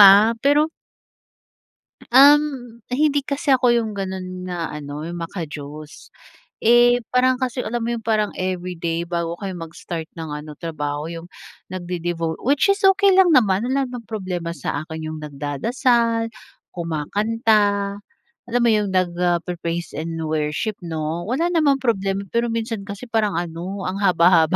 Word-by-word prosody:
ah, 205 +3 +9
pero 295 +4 +3 1.4
Um, 270 -3 +5
hindi 285 +2 +2
kasi 280 0 0
ako 250 -1 +4
yung 230 -2 +1
ganun 185 -2 -5
na 170 -2 -3
ano, 150 0 -6
yung 175 0 -5
maka-Diyos. 155 -3 -7 0.5
Eh, 240 +1 +6
parang 255 +1 +4
kasi 255 -1 -2
alam 235 +1 -3
mo 235 - -1
yung 235 - -4
parang 215 -2 +1
everyday 180 -2 -2
bago 170 -1 -2
kayo 195 -1 -4
mag-start 165 -1 -6
ng 160 -2 -6
ano, 150 0 -7
trabaho 150 -3 -4
yung 165 0 -8 0.4
nagde-devo 175 -3 -3
which 285 - +3
is 395 - 0
okey 395 0 +5
lang 375 -1 +6
naman, 210 -2 +3
wala 270 +2 +1
naman 250 -1 -6
problema 180 -6 -4
sa 145 0 -3
akin 160 -1 -6
yung 155 - -6
nagdadasal, 230 - 0 0.4
kumakanta, 200 +4 0 0.5
alam 245 +1 +1
mo - - +4
'yong, 210 -2 +1
nagpe-praise 175 -1 -1
and 165 +2 -4
worship 155 +7 -1
'no, 160 0 -3
wala 275 +9 +1
namang 300 -5 +3
problema 195 -4 0
pero 235 +1 +1
minsan 225 -2 -3
kasi 200 +5 -7
parang 215 -2 +1
ano, 175 +3 -5
ang 190 +2 -3
haba-haba. 175 -2 +5
195 Hz, 140 wpm, -22 LUFS, 165-235 Hz, 1.4 s, ah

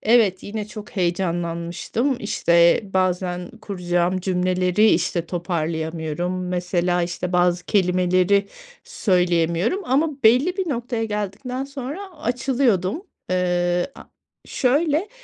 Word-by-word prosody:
evet, 215 -5 +3
yine 210 0 -5
çok 210 -1 -9
heyecanlanmıştım. 175 +6 -1
İşte, 170 -5 +3
bazen 180 -2 -1
kuracağım 180 -2 -1
cümleleri, 185 +2 +2
işte, 170 0 0
toparlayamıyorum. 170 +1 -3
Mesela, 180 0 0
işte, 175 +1 -3
bazı 180 0 +2
kelimeleri 185 +1 +2 0.4
söyleyemiyorum 180 - +1
ama 285 +1 0
belli 255 - +4
bir 375 -3 -2
noktaya 235 -3 -2
geldikten 215 +5 -3
sonra 275 +4 -6 0.2
açılıyordum. 245 - 0 0.3
Eee, 175 +3 0
a - - -11 0.4
şöyle, 300 +7 +1
185 Hz, 100 wpm, -22 LUFS, 175-235 Hz, 0.4 s, belli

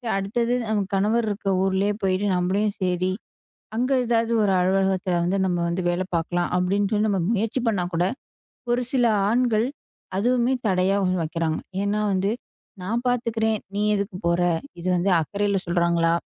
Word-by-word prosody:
சரி 240 -3 -4
அடுத்தது 230 +5 0
நம்ம 215 -2 +1
கணவர் 220 +4 +2
இருக்கிற 200 -1 -2
ஊரிலேயே 195 +2 +1
போயிட்டு 190 +1 +1
நம்மளும் 195 +4 0
சரி 185 0 0 0.6
அங்கு 250 +4 +1
ஏதாவது 230 0 +1
ஒரு 200 - +2
அலுவலகத்தில 190 0 +1
வந்து 180 +3 0
நம்ம 180 -1 0
வந்து 175 +2 -1
வேலை 175 +2 0
பார்க்கலாம் 175 +1 0
அப்படின்னு 195 +3 +1
சொல்லி 215 0 +1
நம்ம 195 -3 +1
முயற்சி 225 +3 0
பண்ணா 200 -6 +1
கூட, 175 +2 +2 0.7
ஒரு 245 +1 +2
சில 250 -3 +2 0.2
ஆண்கள் 235 -1 +2 0.5
அதுவுமே 245 +4 +2
தடையா 190 +1 +2
உருவாக்குறாங்க. 165 -3 -1 0.2
ஏன்னா 205 +1 0
வந்து, 195 +2 +1 0.5
"நான் 230 +6 -2
பார்த்துக்கிறேன், 225 -3 0 0.2
நீ 205 - 0
எதுக்கு 200 -1 -3
போற?" 170 0 +2 0.4
இது 180 - -5
வந்து 180 +3 +1
அக்கறையில் 200 +3 -1
சொல்றாங்களா 170 -1 +2
195 Hz, 150 wpm, -24 LUFS, 180-220 Hz, 0.7 s, கணவர்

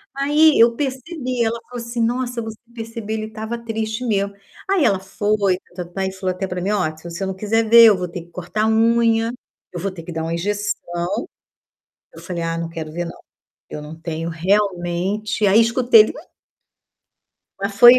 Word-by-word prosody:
Aí 295 +2 +4
eu 230 0 +6
percebi, 260 -1 -2
ela 230 +1 -1
falou 245 -1 -6
assim: 235 0 -3
"Nossa, 245 +2 0
se 235 - -2
você 220 -1 -7 0.2
perceber 225 -2 -5
ele 215 0 -2
estava 220 +1 -5
triste, 225 0 -3
mesmo.", 200 -2 0 0.4
Aí 385 -6 +3
ela 195 -6 +3
foi 200 0 0
e - - -10 0.2
tá-tá-tá, 185 +2 -3
falou 185 -2 -1
até 190 +1 -3
pra 180 0 -4
mim: 195 +3 0
"Ó, 180 -7 0
se 170 +3 -6
eu - - -1
não 190 - -3
quiser 220 +3 +1
ver, 230 0 +10
eu 210 -4 +7
vou 180 - -3
ter 175 +1 -6
que 170 - -16
cortar 180 +5 -3
a - - +3
unha, 225 0 +3 0.4
eu 175 - -5
vou 195 +3 -2
ter 170 -3 -9
que 175 - -8
dar 160 -1 -3
uma 165 +1 -2
injeção", 205 +4 -2 1.3
eu - - -11
falei: 175 -3 -4
"Ah, 165 0 -2
não 165 - -3
quero 160 -2 -6
ver 175 +1 -3
não, 170 - -9 0.5
eu - - -5
não 150 +2 -8
tenho 165 0 -4
realmente" 195 +3 0
aí 200 +4 +6
escutei 230 0 +5
ele: 215 - +5
"uh". 310 - -14 1.3
Mas 200 0 -3
foi, 240 +3 +10
210 Hz, 200 wpm, -21 LUFS, 180-230 Hz, 1.3 s, ver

